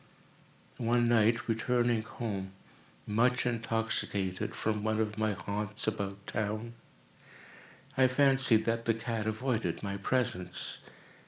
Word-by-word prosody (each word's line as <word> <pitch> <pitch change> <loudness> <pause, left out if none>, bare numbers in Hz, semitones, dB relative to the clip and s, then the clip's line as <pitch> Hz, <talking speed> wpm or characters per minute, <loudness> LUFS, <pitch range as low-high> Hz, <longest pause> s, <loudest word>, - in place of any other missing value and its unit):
One 120 0 +2
night, 115 0 +3
returning 120 0 +1
home, 100 -4 -5 0.5
much 125 +5 +2
intoxicated, 110 -5 -1
from 105 -1 -1
one 110 0 0
of 110 -1 0
my 110 -1 +1
haunts 100 +2 -3
about 100 -2 -3
town, 110 +2 -3 1.2
I 130 -1 +5
fancied 130 -4 +4
that 115 0 0
the 115 - +2
cat 115 -1 -3
avoided 115 +1 -1
my 100 -1 -3
presence. 100 -5 -1
110 Hz, 110 wpm, -31 LUFS, 105-120 Hz, 1.2 s, I